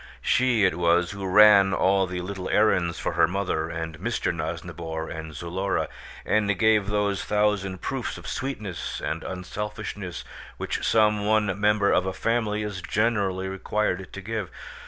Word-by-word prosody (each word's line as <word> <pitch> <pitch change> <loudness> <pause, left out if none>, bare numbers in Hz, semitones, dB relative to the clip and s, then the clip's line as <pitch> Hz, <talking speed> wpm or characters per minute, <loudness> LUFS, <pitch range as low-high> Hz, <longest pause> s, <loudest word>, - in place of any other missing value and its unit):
She 120 -5 +3
it 90 -2 +1
was 85 +1 +3
who 100 -2 -5
ran 100 0 +7
all 95 0 +3
the 90 -1 -4
little 95 0 -5
errands 90 -5 +2
for - - -2
her - - +3
mother 90 -4 -2
and 80 -2 -5
Mr. 115 +6 -1
Nosnibor 80 -1 -5
and 80 -1 -7
Zulora, 95 +5 -2 0.4
and 100 -2 +1
gave 110 -3 +3
those 100 -1 0
thousand 105 -3 0
proofs 135 -3 -3
of - - -12
sweetness 105 - -4
and 80 - -3
unselfishness 100 0 -5 0.3
which - - -3
some 105 -2 +3
one 105 -2 +1
member 105 -1 +3
of 95 - +2
a 95 - -2
family 110 0 0
is 105 -4 -5
generally 100 -3 0
required 95 0 -2
to 100 - -6
give. 105 -1 -4
100 Hz, 155 wpm, -25 LUFS, 90-105 Hz, 0.4 s, ran